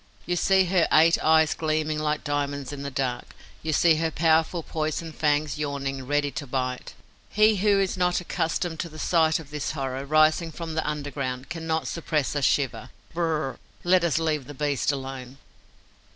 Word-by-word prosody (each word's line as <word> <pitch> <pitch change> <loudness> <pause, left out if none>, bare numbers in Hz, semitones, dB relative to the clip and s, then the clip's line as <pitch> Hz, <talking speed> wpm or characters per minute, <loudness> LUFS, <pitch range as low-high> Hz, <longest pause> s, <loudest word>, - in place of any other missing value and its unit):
You 175 - -1
see 190 +2 +3
her 180 -1 +2
eight 165 +2 +5
eyes 160 0 +4
gleaming 155 -1 -1
like 150 0 -1
diamonds 145 -1 -2
in 140 - -7
the 140 - -4
dark; 130 -3 -3 0.3
you 160 - -2
see 160 +1 +4
her 165 0 0
powerful 160 +1 +2
poison 155 +1 -3
fangs 150 -1 0
yawning, 135 -3 -3
ready 145 0 +1
to 145 - -6
bite. 130 -1 -3 0.3
He 215 0 +4
who 200 +1 +3
is 190 -1 0
not 180 -1 +2
accustomed 165 -1 -2
to 170 - -3
the 155 - -12
sight 160 -1 +2
of 150 -3 -11
this 150 -1 -3
horror, 135 -2 -3
rising 155 +3 +3
from 165 0 -6
under 150 -1 -2
the 145 - -6
ground, 130 -2 -4
cannot 160 -1 -2
suppress 155 -4 -1
a 145 - -1
shiver. 130 -5 0 0.2
B 170 - -6
r - - +2
r 165 - +1
r 155 -1 0
r! - - -11 0.2
Let 180 0 +4
us 170 -3 +1
leave 155 -4 -1
the 145 - -9
beast 145 0 0
alone. 135 -1 -6
155 Hz, 195 wpm, -25 LUFS, 140-165 Hz, 0.3 s, eight